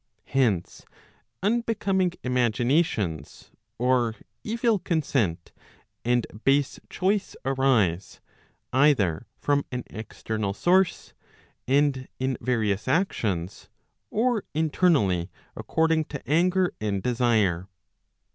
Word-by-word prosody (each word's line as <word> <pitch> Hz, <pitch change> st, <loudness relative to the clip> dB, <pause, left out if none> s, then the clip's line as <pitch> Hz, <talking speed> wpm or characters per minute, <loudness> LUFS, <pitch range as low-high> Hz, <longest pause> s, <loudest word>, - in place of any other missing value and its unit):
Hence 115 Hz, -10 st, 0 dB, 0.6 s
unbecoming 200 Hz, -5 st, +1 dB
imaginations, 120 Hz, -, 0 dB, 0.3 s
or 120 Hz, -2 st, +2 dB, 0.3 s
evil 230 Hz, -1 st, +1 dB
consent 135 Hz, -, -1 dB, 0.5 s
and 120 Hz, 0 st, +2 dB, 0.2 s
base 140 Hz, 0 st, +2 dB
choice 195 Hz, +2 st, 0 dB
arise, 125 Hz, -10 st, +1 dB, 0.5 s
either 130 Hz, -, +3 dB
from 145 Hz, -1 st, +1 dB
an 125 Hz, -1 st, -3 dB
external 110 Hz, -2 st, -4 dB
source 185 Hz, -, +2 dB, 0.5 s
and 135 Hz, -1 st, +2 dB
in 130 Hz, 0 st, -1 dB
various 110 Hz, -4 st, 0 dB
actions, 105 Hz, -, -1 dB, 0.4 s
or 230 Hz, -1 st, +1 dB
internally 145 Hz, -, +2 dB, 0.3 s
according 160 Hz, -1 st, +1 dB
to 140 Hz, -5 st, -8 dB
anger 180 Hz, +5 st, +2 dB
and 100 Hz, -3 st, -1 dB
desire. 110 Hz, -8 st, +1 dB
130 Hz, 85 wpm, -26 LUFS, 110-170 Hz, 0.6 s, either